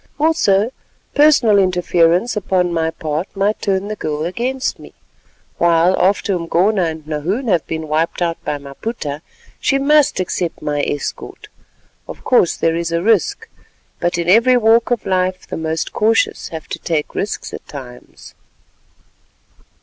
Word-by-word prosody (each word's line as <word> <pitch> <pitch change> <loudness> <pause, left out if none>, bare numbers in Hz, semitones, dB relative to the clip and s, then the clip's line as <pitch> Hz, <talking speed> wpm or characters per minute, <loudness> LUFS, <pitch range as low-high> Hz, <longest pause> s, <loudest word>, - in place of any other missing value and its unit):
Also 240 -9 +2 0.4
personal 285 -8 +5
interference 180 +3 +2
upon 180 -3 0
my 160 -1 0
part 160 +2 -3
might 200 +2 0
turn 195 -1 0
the 215 - -4
girl 155 -4 -3
against 250 +9 -2
me; - - -14 0.6
while 170 +2 +4
after 200 +1 +2
Umgona 180 +3 +1
and 160 -2 -5
Nahoon 165 - -2
have 170 -5 +1
been 160 -1 -4
wiped 155 +2 -1
out 170 -2 -2
by 150 - -2
Maputa, 145 - -6 0.4
she 275 - +1
must 295 -2 +3
accept 180 -2 -2
my 145 -1 -2
escort. 145 0 -5 0.6
Of - - -10
course 240 -9 +3
there 165 0 +1
is 170 0 -2
a 170 +1 -1
risk, 215 -4 +1 0.5
but 175 0 0
in 170 0 -2
every 230 +7 +5
walk 230 0 +3
of 240 -4 -1
life 185 -1 -1
the - - -5
most 160 0 -3
cautious 225 +1 +1
have 160 -1 -8
to - - -5
take 155 -3 -2
risks 200 - -4
at - - -9
times." 125 -4 -11
180 Hz, 150 wpm, -18 LUFS, 160-215 Hz, 0.6 s, personal